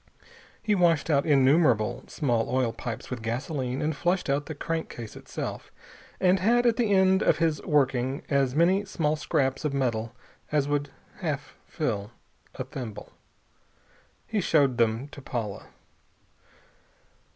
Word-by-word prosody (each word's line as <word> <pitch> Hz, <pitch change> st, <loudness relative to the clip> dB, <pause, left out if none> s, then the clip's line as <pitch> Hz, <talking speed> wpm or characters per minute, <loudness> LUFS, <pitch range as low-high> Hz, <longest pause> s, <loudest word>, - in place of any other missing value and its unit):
He 215 Hz, -2 st, +2 dB
washed 170 Hz, -5 st, +3 dB
out 140 Hz, 0 st, +2 dB
innumerable 135 Hz, -5 st, +3 dB
small 120 Hz, -7 st, 0 dB
oil 125 Hz, -3 st, +1 dB
pipes 120 Hz, 0 st, -6 dB
with 125 Hz, -2 st, -4 dB
gasoline, 130 Hz, +3 st, -2 dB
and 155 Hz, 0 st, 0 dB
flushed 175 Hz, -1 st, 0 dB
out 145 Hz, +1 st, 0 dB
the 155 Hz, -, -5 dB
crankcase 155 Hz, -8 st, -4 dB
itself, -, -, -6 dB, 0.5 s
and 185 Hz, 0 st, +4 dB
had 240 Hz, +6 st, +3 dB
at 235 Hz, -2 st, +3 dB
the 230 Hz, -4 st, +1 dB
end 190 Hz, -1 st, +4 dB
of -, -, +3 dB
his 160 Hz, -2 st, +1 dB
working 135 Hz, -2 st, +1 dB
as 135 Hz, -2 st, +1 dB
many 180 Hz, +5 st, +4 dB
small 160 Hz, -6 st, 0 dB
scraps 145 Hz, -3 st, 0 dB
of 150 Hz, -2 st, -1 dB
metal 115 Hz, -3 st, -1 dB, 0.4 s
as 145 Hz, -2 st, +2 dB
would 145 Hz, 0 st, -1 dB, 0.3 s
half 150 Hz, -5 st, -4 dB
fill 105 Hz, -10 st, -2 dB, 0.5 s
a -, -, -3 dB
thimble. 110 Hz, -6 st, -7 dB, 1.1 s
He 215 Hz, -3 st, -1 dB
showed 140 Hz, -8 st, +2 dB
then 115 Hz, +3 st, +1 dB
to 145 Hz, -, -11 dB
Paula. 115 Hz, -7 st, -4 dB
145 Hz, 140 wpm, -27 LUFS, 125-165 Hz, 1.1 s, and